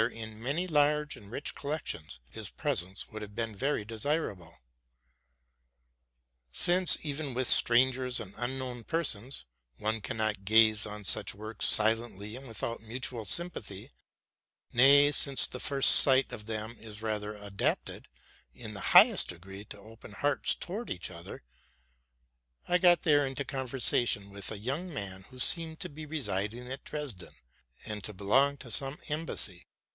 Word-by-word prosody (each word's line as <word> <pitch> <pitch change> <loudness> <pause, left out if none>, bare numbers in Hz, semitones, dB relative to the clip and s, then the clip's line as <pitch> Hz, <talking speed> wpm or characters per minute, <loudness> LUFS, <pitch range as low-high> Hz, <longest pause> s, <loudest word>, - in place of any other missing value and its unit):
in 110 -1 -9
many 145 +9 -2
large 150 -2 +1
and 100 -4 -14
rich 135 +6 -3
collections, 140 - -5
his - - -5
presence 95 +3 -2
would 110 - -8
have 105 -1 -9
been 115 -2 -3
very 135 -1 -2
desirable. 110 - -4 1.9
Since, 180 - +3
even 145 -3 -4
with 130 -1 0
strangers 125 +1 +4
and 100 -3 -8
unknown 125 0 -4
persons, 135 -5 -3 0.3
one 110 +1 -2
can 110 - -5
not 110 -3 -2
gaze 110 0 +4
on 105 0 -7
such - - +1
works 110 +1 -2
silently 110 -1 +2
and 135 +1 -9
without 115 0 -5
mutual 115 0 -4
sympathy, 120 - -3 0.8
—nay, 140 +3 +6
since 140 -2 +2
the 125 - -7
first 140 0 +6
sight 130 -2 +6
of 105 -3 -8
them 110 +1 -4
is 110 -1 -9
rather 105 -1 -3
adapted, 100 -1 -3 0.5
in 110 -3 -8
the 100 - -5 0.2
highest - - +7
degree, 95 +3 -9
to 105 - -10
open 110 +1 -14
hearts 145 +7 +1
towards 210 +7 -5
each 90 0 -4
other, 85 -1 -9 1.2
I 180 - +2
there 175 -1 +6
got - - -20
into 140 -2 +1
conversation 125 -6 0
with 100 0 -4
a 110 - -4
young 140 - -4
man 95 - -6
who 130 - -15
seemed 160 +4 +2
to - - -5
be 155 +1 -10
resid 105 -8 -2
ing 125 +1 -9
at 135 - -6
Dresden, 140 - -6 0.5
and 105 -2 -5
to 105 - -7
belong 135 +9 +2
to 125 -4 -10
some 135 +5 +1
embassy. 145 - -1
115 Hz, 150 wpm, -30 LUFS, 105-140 Hz, 1.9 s, highest